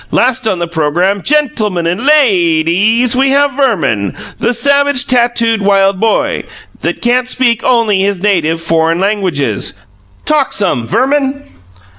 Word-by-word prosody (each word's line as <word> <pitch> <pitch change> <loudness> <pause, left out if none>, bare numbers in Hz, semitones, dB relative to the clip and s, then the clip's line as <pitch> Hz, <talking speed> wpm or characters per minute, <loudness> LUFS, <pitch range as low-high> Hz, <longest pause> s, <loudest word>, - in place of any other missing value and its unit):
Last 255 -1 0
on 190 - 0
the 170 0 -3
programme, 170 +5 -1
gen 300 +2 +1
til 215 -3 -1
mun 175 -3 -3
and 180 +7 -2
lay 195 - +3
deeze, 220 +9 +1
we 270 +1 +2
have 285 +1 +2
Verman, 160 - -1 0.2
the 240 - 0
savage 280 +1 +1
tattooed 235 -3 +1
wild 195 -1 +2
boy, 225 +1 0 0.4
that - - -3
can't 250 +1 +1
speak 245 -3 0
only 225 -6 +2
his 200 -1 -1
native 170 -5 0
foreign 165 0 0
languages. 175 - -1 0.5
Talk 300 -3 +1
some, 175 - -1
Verman." 275 - 0
215 Hz, 145 wpm, -12 LUFS, 175-255 Hz, 0.5 s, lay